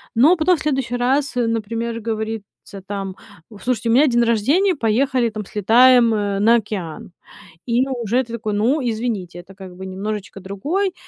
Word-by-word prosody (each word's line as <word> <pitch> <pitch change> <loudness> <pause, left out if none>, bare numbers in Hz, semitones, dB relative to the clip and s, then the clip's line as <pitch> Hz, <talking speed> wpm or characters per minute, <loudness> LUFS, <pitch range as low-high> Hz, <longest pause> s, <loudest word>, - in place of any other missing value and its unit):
Но 305 +10 +5
потом 345 +2 +3
в - - -11
следующий 270 -5 -1
раз, 265 +3 0
э, 240 -1 +1
например, 230 +1 -3
говорится 220 -3 -6
там: 195 -2 -5 0.3
"У, 210 - -13
слушайте, 235 -2 -1
у - - +3
меня 285 +4 +5
день 240 -1 +2
рождения, 285 - +2
поехали, 240 +1 +1
там, 215 -2 -6
слетаем, 235 +3 +4
э, 205 -2 -1
на 230 +3 +5
океан". 190 -7 -4 0.6
И 245 +3 +1
уже 245 -1 0
ты 235 0 -9
такой: 215 -2 -3
"Ну, 240 +9 +1
извините, 220 -7 -3
это 190 +2 -15
как 190 -2 -11
бы 190 +1 -8
немножечко 200 +1 -5
другой". 305 - -2
230 Hz, 175 wpm, -20 LUFS, 205-255 Hz, 0.6 s, Но